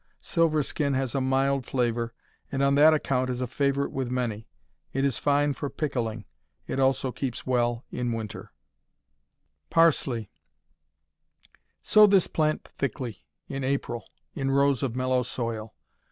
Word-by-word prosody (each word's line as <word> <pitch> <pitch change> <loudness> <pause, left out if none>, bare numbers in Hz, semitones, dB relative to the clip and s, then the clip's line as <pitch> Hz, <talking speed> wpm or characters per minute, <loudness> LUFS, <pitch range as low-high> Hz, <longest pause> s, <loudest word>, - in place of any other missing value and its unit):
Silverskin 155 -4 +1
has 130 -2 -1
a 135 - 0
mild 135 0 +1
flavor, 120 -2 0 0.4
and 135 0 0
on 140 0 +4
that 150 +3 +7
account 130 -4 +1
it - - 0
is 125 - -4
a - - +1
favorite 140 +2 0
with 130 -2 -3
many. 120 -4 -2 0.5
It 135 +1 +1
is 140 - 0
fine 145 0 +2
for 140 +1 -4
pickling. 115 -9 -3 0.4
It - - -3
also 135 -1 +2
keeps 125 -2 -4
well 120 -2 0
in 120 -1 -2
winter. 110 -3 -6 1.2
Parsley 135 -9 +2 1.5
Sow 215 0 +7
this 195 -3 +5
plant 155 -1 0
thickly, 125 -4 -5 0.2
in 135 -1 -4
April, 130 -4 -2 0.2
in 135 -1 -2
rows 140 -1 +3
of 130 -4 -2
mellow 130 0 +1
soil. 115 -3 -4
130 Hz, 140 wpm, -27 LUFS, 120-140 Hz, 1.5 s, that